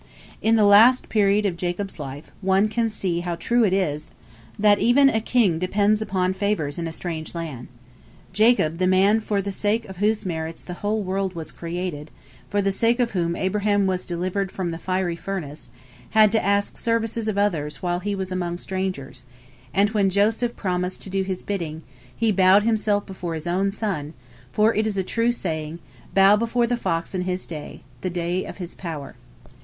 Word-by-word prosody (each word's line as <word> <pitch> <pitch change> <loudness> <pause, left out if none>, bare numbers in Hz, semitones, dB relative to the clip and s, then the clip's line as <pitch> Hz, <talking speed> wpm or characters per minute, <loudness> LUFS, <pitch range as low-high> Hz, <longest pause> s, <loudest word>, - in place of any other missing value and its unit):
In 225 +1 +3
the 220 - +4
last 225 +6 +6
period 205 -1 +3
of 190 -4 0
Jacob's 180 +2 -3
life, 140 +1 -8
one 195 +2 +3
can 225 +1 0
see 185 -5 -2
how 175 0 -3
true 235 +7 +1
it 205 - +3
is 155 -6 -1 0.5
that 205 -1 +4
"even 275 +4 +5
a 220 -4 0
king 215 -9 +2
depends 205 +4 +2
upon 185 -3 0
favors 190 -7 -1
in 165 - -2
a - - -4
strange 160 -1 -5
land." 150 -8 -6 0.7
Jacob, 205 -6 +3
the 185 - +2
man 195 +4 +4
for 205 -2 -1
the 200 - -3
sake 215 +3 0
of 190 -1 -10
whose 210 +2 +1
merits 160 -2 -4
the 180 - -7
whole 210 +1 0
world 190 0 -2
was 160 -2 -6
created, 170 -3 -5 0.4
for 205 -1 0
the 195 - +2
sake 230 +5 +2
of 240 -2 +1
whom 170 -3 -1
Abraham 205 +2 +1
was 185 -1 -1
delivered 185 +3 -2
from 180 -3 -3
the 165 - -6
fiery 185 -2 -1
furnace, 170 -5 -6 0.5
had 215 -1 +7
to 220 - +2
ask 200 +1 +1
services 230 -1 0
of 210 -2 -1
others 165 -8 -1
while 175 0 0
he 200 +2 -2
was 190 -1 -4
among 175 -1 -2
strangers, 185 -9 -4 0.5
and 200 +3 +2
when 205 -3 +2
Joseph 220 +5 +1
promised 180 -1 -2
to 190 - -8
do 195 0 0
his 190 -1 -3
bidding, 165 -6 -4 0.3
he 225 -1 +2
bowed 190 +1 +5
himself 215 -2 +1
before 180 -3 -5
his 160 0 -6
own 185 +3 +1
son, 190 -8 -3 0.4
for 215 +2 +3
it 215 +1 +1
is 205 -2 -2
a 190 - +1
true 230 +5 +1
saying, 160 -7 -3 0.4
"Bow 195 +1 +7
before 235 +2 +1
the 245 +1 0
fox 170 -7 -2
in 185 - -1
his 180 0 -3
day," 155 -3 -8 0.2
the 185 - -2
day 175 +1 -2
of - - -8
his 180 -3 -6
power. 160 -6 -7
190 Hz, 190 wpm, -23 LUFS, 175-210 Hz, 0.7 s, had